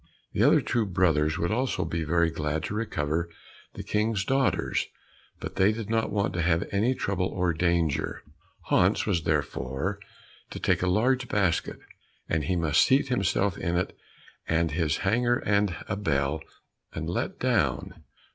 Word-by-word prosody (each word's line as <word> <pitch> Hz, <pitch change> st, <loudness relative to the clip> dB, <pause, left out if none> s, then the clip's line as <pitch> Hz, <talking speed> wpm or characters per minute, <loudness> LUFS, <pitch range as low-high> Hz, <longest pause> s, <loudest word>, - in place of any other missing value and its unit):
The -, -, -3 dB, 0.3 s
two 120 Hz, -, +1 dB
other 105 Hz, -, -2 dB
brothers 80 Hz, -4 st, +2 dB
would 85 Hz, -, -1 dB
also 115 Hz, -6 st, 0 dB
be 80 Hz, 0 st, -2 dB
very 85 Hz, +1 st, +2 dB
glad 75 Hz, -1 st, -2 dB
to -, -, -4 dB
recover 85 Hz, -6 st, -1 dB, 0.5 s
the -, -, -6 dB
King's 105 Hz, -2 st, 0 dB
daughters, 135 Hz, 0 st, +1 dB, 0.5 s
but -, -, -7 dB
they 95 Hz, +2 st, +5 dB
did 110 Hz, -1 st, -5 dB
not 115 Hz, -1 st, +1 dB
want 100 Hz, 0 st, 0 dB
to 90 Hz, -, -1 dB
have 80 Hz, 0 st, +1 dB
any 110 Hz, +6 st, +1 dB
trouble 95 Hz, -5 st, -1 dB
or 90 Hz, -2 st, 0 dB
danger. 85 Hz, -3 st, 0 dB, 0.4 s
Hans -, -, +2 dB
was 85 Hz, -3 st, 0 dB
therefore 70 Hz, +11 st, -1 dB, 0.5 s
to -, -, -7 dB
take -, -, +1 dB
a 90 Hz, -, +1 dB
large 120 Hz, +7 st, +2 dB
basket, 95 Hz, -6 st, 0 dB, 0.5 s
and 80 Hz, -3 st, 0 dB
he 90 Hz, -, 0 dB
must 80 Hz, -2 st, +3 dB
seat 135 Hz, +1 st, +3 dB
himself 100 Hz, -4 st, +1 dB
in 85 Hz, +1 st, -1 dB
it 90 Hz, -, -2 dB, 0.5 s
with 80 Hz, 0 st, +1 dB
his 75 Hz, -2 st, 0 dB
hanger 120 Hz, +4 st, +3 dB
and 100 Hz, -3 st, +2 dB
a 100 Hz, -, -1 dB
bell, 75 Hz, -5 st, 0 dB, 0.5 s
and -, -, -4 dB
be -, -, -3 dB
let -, -, -2 dB
down. -, -, 0 dB
90 Hz, 165 wpm, -27 LUFS, 80-105 Hz, 0.5 s, they